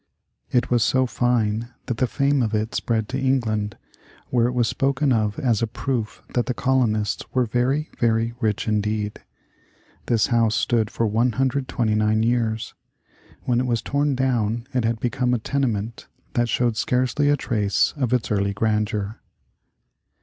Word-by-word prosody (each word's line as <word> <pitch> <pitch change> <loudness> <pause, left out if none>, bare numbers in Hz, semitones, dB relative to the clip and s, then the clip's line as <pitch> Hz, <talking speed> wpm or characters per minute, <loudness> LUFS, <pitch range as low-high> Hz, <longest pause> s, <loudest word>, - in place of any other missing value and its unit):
It 125 -1 +1
was 120 -2 +4
so 130 0 +3
fine 120 -2 0 0.2
that 120 - -3
the 130 - +2
fame 140 +5 +1
of 110 -2 0
it 110 +1 -1
spread 110 -2 -1
to 130 - -2
England, 110 -6 0 0.5
where 120 -2 +3
it 125 - -2
was 120 -2 +2
spoken 135 +1 +1
of 105 -2 0
as 120 -6 +1
a 115 - +1
proof 110 -4 -3
that 120 - 0
the 125 - -1
colonists 115 -6 +1
were 125 -1 +3
very, 125 +7 0
very 115 0 +1
rich 110 -3 -1
indeed. 105 0 -1 0.9
This 115 -2 +3
house 115 -2 +3
stood 115 -3 +1
for 115 - -1
129 115 -2 +1
years. 115 -2 0 0.7
When 120 -1 +1
it 130 - 0
was 115 -2 0
torn 140 0 0
down 120 -3 0
it 125 -3 +1
had 115 0 0
become 125 +1 0
a - - +1
tenement 115 -3 -2 0.3
that 120 -1 +1
showed 120 0 +1
scarcely 130 +5 +1
a 145 - +3
trace 105 -6 +1
of 130 -5 -1
its 125 -3 0
early 100 -1 +1
grandeur. 105 0 -1
115 Hz, 155 wpm, -23 LUFS, 110-125 Hz, 0.9 s, was